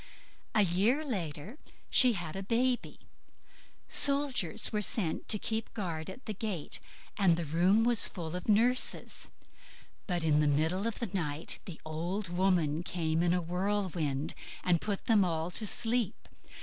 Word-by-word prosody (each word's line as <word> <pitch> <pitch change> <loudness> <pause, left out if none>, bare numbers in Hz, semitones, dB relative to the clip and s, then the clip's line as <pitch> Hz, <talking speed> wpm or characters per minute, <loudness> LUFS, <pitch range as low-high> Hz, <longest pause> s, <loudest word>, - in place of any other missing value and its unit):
A 215 - +5
year 200 - +2
after 170 - -6 0.3
she 250 -2 +6
had 175 -5 -5
a 195 - -4
baby. 245 +5 -1 0.9
Soldiers 280 - +4
were 210 - 0
set 200 -6 -1
to 210 - +3
keep 220 +2 -3
guard 170 -6 -4
at 220 +7 -10
the 215 - -4
gate, 205 -6 -4 0.4
and 180 -5 +3
the 170 - -3
room 180 +8 +3
was 235 -2 +6
full 170 -2 -6
of 180 - -5
nurses; 240 +4 +1 0.8
but 175 -4 -1
in 150 -2 +3
the 150 - +2
middle 160 +8 +1
of 230 - -3
the 235 -6 -4
night 155 -5 -2
the 170 -4 -8
old 170 +5 -4
woman 175 -4 +1
came 165 -2 -1
in 175 0 +2
a 180 0 0
whirlwind 175 -5 -2 0.3
and 175 -2 +2
put 205 -2 -3
them 215 -4 +4
all 165 -1 -2
to 215 +3 -2
sleep. 225 -1 +1
185 Hz, 155 wpm, -31 LUFS, 165-215 Hz, 0.9 s, she